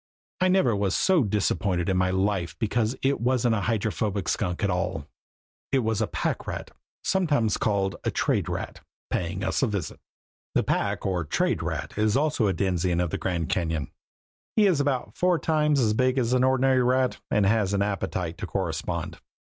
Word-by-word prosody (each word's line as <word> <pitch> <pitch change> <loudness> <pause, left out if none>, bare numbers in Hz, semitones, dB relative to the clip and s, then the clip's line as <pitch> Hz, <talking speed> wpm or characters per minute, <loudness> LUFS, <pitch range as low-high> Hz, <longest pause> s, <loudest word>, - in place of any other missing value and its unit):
I 185 - +3
never 185 - +3
was 100 -1 0
so 185 -6 +3
disappointed 100 -3 0
in 95 - +1
my 90 0 +2
life 95 -2 -1
because 115 +1 0
it 135 -2 +1
wasn't 120 -1 +2
a 105 - 0
Hydrophobic 105 -2 -1
Skunk 90 -1 -1
at 100 - +2
all. 90 -4 -2 0.7
It 135 -3 +2
was 110 0 0
a 110 - +1
pack - - -2
rat, - - -5 0.3
sometimes 145 - +1
called 100 -3 0
a - - 0
trade - - 0
rat, - - -5 0.3
paying 90 +2 -2
us - - 0
a 135 - +3
visit. 100 -4 -4 0.6
The - - +3
pack - - -1
or 90 -3 0
trade 75 - 0
rat - - -4
is 110 +2 +3
also 145 -6 +1
a 95 - +1
denizen 90 -1 0
of 90 -2 0
the - - -2
Grand 85 -4 -2
Cañon. 80 -4 -1 0.6
He 215 - +5
is 180 -7 +3
about 140 -3 -1
four 180 -1 +2
times 150 -3 +2
as 110 -4 +2
big 130 +3 +2
as 125 -1 +1
an 130 0 +3
ordinary 130 0 +3
rat 130 +1 +1
and 105 - +2
has 100 -1 +2
an 100 - +2
appetite 95 -4 -3
to - - -4
correspond. - - -3
110 Hz, 185 wpm, -26 LUFS, 95-130 Hz, 0.7 s, He